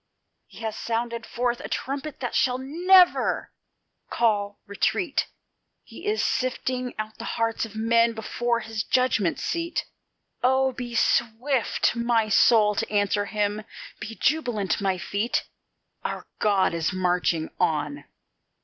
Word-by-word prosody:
He - - -14
has 220 -1 -3
sounded 235 0 -3
forth 240 0 -1
the - - -7
trumpet 280 +2 -4
that 245 - -3
shall 250 -1 +2
never 350 +7 +4 0.6
call 205 -3 0
retreat; 270 - 0 0.6
He - - -10
is 430 +1 +1
sifting 255 0 -1
out 215 +1 -5
the - - -6
hearts 230 0 0
of 220 - -16
men 230 +1 +3
before 235 +1 -1
his 225 -1 -3
judgment 240 -9 +1
seat: 335 -1 -2 0.6
Oh! 265 +1 +3
be 245 -1 -6
swift, 240 +3 +1
my 235 -2 +1
soul, 210 0 +5
to - - -2
answer 205 0 +1
Him! 210 0 -1 0.4
be 225 0 -6
jubilant, 240 - 0
my 190 -2 +1
feet! 205 +5 -1 0.6
Our - - -4
God 195 -4 +2
is 165 +1 0
marching 180 -3 0
on. 150 -4 0
230 Hz, 130 wpm, -25 LUFS, 205-250 Hz, 0.6 s, soul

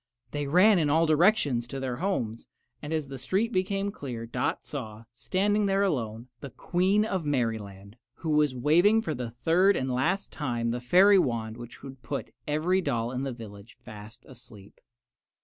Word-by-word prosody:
They 145 -1 -3
ran 185 +6 +5
in 150 -3 +1
all 160 +3 +3
directions 155 - +2
to 135 - -6
their 130 -2 -3
homes, 120 - -3 0.3
and 150 - -7
as 155 -3 -1
the 135 -1 -7
street 195 - 0
became 195 +2 -1
clear 125 - -6
Dot 125 +2 -2
saw, 110 -6 -7
standing 195 - 0
there 195 0 +2
alone, 120 - -2
the 140 - -8
Queen 190 +8 +1
of 190 -5 -2
Merryland, 110 -7 -3 0.2
who 160 - -4
was 150 -3 +2
waving 175 - +4
for 160 - -2
the 125 -4 -5
third 165 - +2
and 130 -1 -2
last 180 +11 -1
time 120 -6 -2
the 120 +1 -3
fairy 190 +10 +6
wand 115 -7 -1
which 120 0 -11
would 135 -2 -10
put 140 +1 -5
every 165 +6 +1
doll 120 -7 -1
in 130 0 -3
the 135 -1 -3
village 110 -2 -11
fast 110 0 -11
asleep. 115 -6 -16
140 Hz, 175 wpm, -27 LUFS, 120-180 Hz, 0.3 s, fairy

